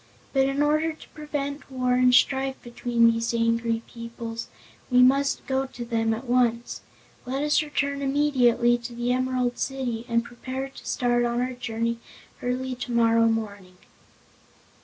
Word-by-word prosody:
But, 270 Hz, 0 st, +3 dB
in 275 Hz, +2 st, +1 dB
order 310 Hz, +2 st, +1 dB
to 310 Hz, -, -16 dB
prevent 290 Hz, -2 st, -5 dB
war 255 Hz, -1 st, 0 dB
and 250 Hz, 0 st, +4 dB
strife 265 Hz, +1 st, +2 dB
between 235 Hz, -1 st, +2 dB
these 230 Hz, +1 st, -1 dB
angry 230 Hz, 0 st, +1 dB
peoples, 230 Hz, -1 st, -7 dB, 0.4 s
we 250 Hz, -1 st, +6 dB
must 275 Hz, +2 st, +3 dB
go 265 Hz, 0 st, 0 dB
to 245 Hz, -2 st, -8 dB
them 225 Hz, -1 st, 0 dB
at 225 Hz, +4 st, -3 dB
once. 240 Hz, -1 st, +1 dB, 0.5 s
Let 270 Hz, +3 st, -1 dB
us 295 Hz, +1 st, +3 dB
return 280 Hz, -2 st, -2 dB
immediately 255 Hz, -4 st, +3 dB
to 235 Hz, 0 st, -8 dB
the 240 Hz, +1 st, 0 dB
Emerald 255 Hz, -1 st, -1 dB
City 245 Hz, -4 st, -3 dB
and 235 Hz, 0 st, +2 dB
prepare 260 Hz, +3 st, -6 dB
to 270 Hz, -, -13 dB
start 240 Hz, -1 st, +1 dB
on 240 Hz, 0 st, 0 dB
our 255 Hz, +1 st, -1 dB
journey 230 Hz, -1 st, -3 dB, 0.4 s
early 255 Hz, +1 st, -2 dB
tomorrow 230 Hz, -2 st, +2 dB
morning." 200 Hz, -5 st, -3 dB
245 Hz, 150 wpm, -25 LUFS, 235-270 Hz, 0.5 s, we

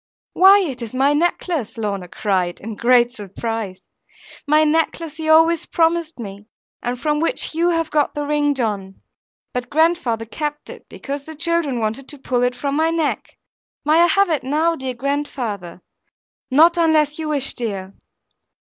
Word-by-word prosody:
'Why, 390 Hz, +2 st, +7 dB
it 270 Hz, -9 st, -4 dB
is 235 Hz, +1 st, -6 dB
my 270 Hz, +2 st, +3 dB
glass 295 Hz, -, +2 dB
necklace!' 330 Hz, -, -1 dB
Lorna 200 Hz, -4 st, -3 dB
cried, 185 Hz, -3 st, -1 dB
in 220 Hz, +2 st, -6 dB
great 240 Hz, +1 st, +4 dB
surprise; 210 Hz, -2 st, -5 dB, 0.6 s
'my 305 Hz, +1 st, +4 dB
necklace 320 Hz, 0 st, 0 dB
he 315 Hz, -1 st, -3 dB
always 325 Hz, +1 st, +4 dB
promised 330 Hz, -1 st, +1 dB
me; 205 Hz, -2 st, -9 dB, 0.3 s
and 245 Hz, 0 st, -3 dB
from 300 Hz, +2 st, 0 dB
which 330 Hz, +4 st, -1 dB
you 340 Hz, +2 st, +2 dB
have 330 Hz, -2 st, 0 dB
got 295 Hz, -1 st, +1 dB
the 295 Hz, 0 st, -2 dB
ring, 290 Hz, -1 st, +1 dB
John. 205 Hz, -6 st, -2 dB, 0.6 s
But 250 Hz, 0 st, -4 dB
grandfather 310 Hz, -8 st, +1 dB
kept 295 Hz, +5 st, -5 dB
it, -, -, -13 dB
because 280 Hz, 0 st, -6 dB
the 315 Hz, -, -9 dB
children 325 Hz, -5 st, 0 dB
wanted 225 Hz, +5 st, -3 dB
to 295 Hz, -, -5 dB
pull 255 Hz, -2 st, -1 dB
it 245 Hz, 0 st, +1 dB
from 280 Hz, +1 st, -2 dB
my 320 Hz, +2 st, +2 dB
neck. 330 Hz, -2 st, -2 dB, 0.5 s
May 310 Hz, +2 st, +4 dB
I 345 Hz, -, +6 dB
have 395 Hz, +1 st, +3 dB
it 305 Hz, -, +1 dB
now, 310 Hz, +5 st, +1 dB
dear 260 Hz, -3 st, -5 dB
grandfather? 235 Hz, -10 st, -4 dB, 0.7 s
Not 325 Hz, +6 st, +5 dB
unless 310 Hz, -2 st, +2 dB
you 315 Hz, -1 st, -3 dB
wish, 280 Hz, -3 st, 0 dB
dear.' 195 Hz, -5 st, -4 dB
285 Hz, 165 wpm, -20 LUFS, 230-320 Hz, 0.7 s, Why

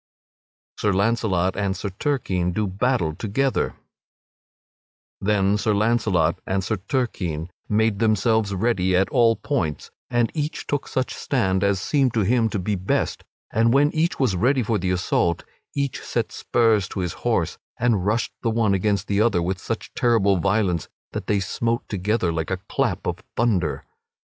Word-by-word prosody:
[Sidenote: -, -, -14 dB
Sir 100 Hz, -3 st, +1 dB
Launcelot 100 Hz, -4 st, +1 dB
and 100 Hz, -1 st, -1 dB
Sir 100 Hz, -, -3 dB
Turquine 95 Hz, -, 0 dB
do 105 Hz, +3 st, 0 dB
battle 95 Hz, -3 st, 0 dB
together] 125 Hz, -, -1 dB, 1.5 s
Then 100 Hz, 0 st, +2 dB
Sir 110 Hz, -1 st, +1 dB
Launcelot 100 Hz, -6 st, +2 dB
and 95 Hz, 0 st, 0 dB
Sir 110 Hz, -, -1 dB
Turquine 90 Hz, -, -2 dB, 0.2 s
made 110 Hz, -1 st, +2 dB
themselves 110 Hz, -1 st, +2 dB
ready 95 Hz, -3 st, +1 dB
at 95 Hz, +2 st, +3 dB
all 115 Hz, -3 st, +4 dB
points, 90 Hz, -, -2 dB, 0.2 s
and 120 Hz, -1 st, +1 dB
each 155 Hz, +1 st, -3 dB
took 145 Hz, -2 st, -2 dB
such 130 Hz, 0 st, -2 dB
stand 95 Hz, -8 st, 0 dB
as 100 Hz, -1 st, +2 dB
seemed 135 Hz, -, +1 dB
to 110 Hz, -, +3 dB
him 115 Hz, +3 st, +2 dB
to 105 Hz, -, -2 dB
be 100 Hz, +3 st, -1 dB
best; 95 Hz, -1 st, -1 dB, 0.3 s
and 115 Hz, +3 st, +3 dB
when 145 Hz, +2 st, +4 dB
each 160 Hz, +2 st, 0 dB
was 125 Hz, -8 st, +2 dB
ready 125 Hz, +7 st, +2 dB
for 110 Hz, -1 st, 0 dB
the 90 Hz, +1 st, -1 dB
assault, 90 Hz, -1 st, +1 dB, 0.3 s
each 140 Hz, -2 st, -2 dB
set -, -, -2 dB
spurs 110 Hz, -5 st, +2 dB
to 95 Hz, -, -4 dB
his 90 Hz, -2 st, -2 dB
horse -, -, 0 dB, 0.2 s
and 115 Hz, -6 st, +2 dB
rushed 105 Hz, +4 st, 0 dB
the 115 Hz, -, 0 dB
one 110 Hz, -3 st, +2 dB
against 100 Hz, 0 st, +1 dB
the 100 Hz, 0 st, +1 dB
other 110 Hz, -5 st, +3 dB
with 95 Hz, +2 st, -2 dB
such -, -, -5 dB
terrible 105 Hz, -5 st, +3 dB
violence 95 Hz, -3 st, 0 dB, 0.2 s
that -, -, -5 dB
they 105 Hz, -1 st, +2 dB
smote 115 Hz, +5 st, -1 dB
together 100 Hz, -2 st, 0 dB
like 80 Hz, -1 st, -2 dB
a 95 Hz, -, -1 dB
clap -, -, -1 dB
of -, -, -2 dB, 0.2 s
thunder. 100 Hz, -10 st, +1 dB
105 Hz, 165 wpm, -23 LUFS, 95-115 Hz, 1.5 s, all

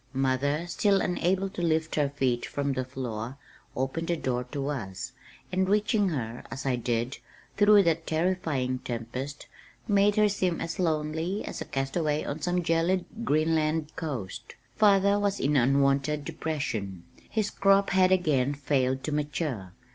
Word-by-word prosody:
Mother, 135 Hz, +4 st, +1 dB
still 195 Hz, +3 st, +2 dB
unable 185 Hz, +2 st, +1 dB
to 190 Hz, -, -6 dB
lift 160 Hz, -1 st, +1 dB
her 145 Hz, -2 st, +2 dB
feet 130 Hz, -4 st, 0 dB
from 140 Hz, -1 st, -2 dB
the 130 Hz, 0 st, -1 dB
floor, 125 Hz, -1 st, -5 dB, 0.4 s
opened 135 Hz, +6 st, -2 dB
the 170 Hz, -, 0 dB
door 125 Hz, -3 st, -1 dB
to 140 Hz, +2 st, -3 dB
us, 120 Hz, -2 st, -4 dB, 0.4 s
and 185 Hz, 0 st, +1 dB
reaching 210 Hz, 0 st, +2 dB
her, 120 Hz, -7 st, -4 dB
as 135 Hz, -, -6 dB
I 130 Hz, -2 st, +2 dB
did, 120 Hz, +1 st, -2 dB, 0.4 s
through 205 Hz, 0 st, +6 dB
that 165 Hz, -1 st, 0 dB
terrifying 155 Hz, -7 st, 0 dB
tempest, 125 Hz, +4 st, -5 dB, 0.4 s
made 205 Hz, 0 st, +4 dB
her 210 Hz, 0 st, +5 dB
seem 185 Hz, -4 st, 0 dB
as 165 Hz, -, -4 dB
lonely 160 Hz, +3 st, -1 dB
as -, -, -6 dB
a -, -, -3 dB
castaway 150 Hz, +3 st, -1 dB
on 150 Hz, +2 st, -4 dB
some 180 Hz, +3 st, 0 dB
gelid 170 Hz, +3 st, +1 dB, 0.2 s
Greenland 155 Hz, -3 st, +1 dB
coast. 135 Hz, -, -5 dB, 0.2 s
Father 200 Hz, -1 st, +4 dB
was 200 Hz, -1 st, 0 dB
in 145 Hz, +2 st, +1 dB
unwonted 140 Hz, +2 st, +2 dB
depression. 130 Hz, -, -3 dB, 0.3 s
His 215 Hz, -2 st, -1 dB
crop 195 Hz, 0 st, +3 dB
had 185 Hz, 0 st, +4 dB
again 145 Hz, -7 st, +2 dB
failed 130 Hz, -2 st, 0 dB
to 155 Hz, -, -3 dB
mature. 145 Hz, -, -2 dB
150 Hz, 150 wpm, -28 LUFS, 130-180 Hz, 0.4 s, through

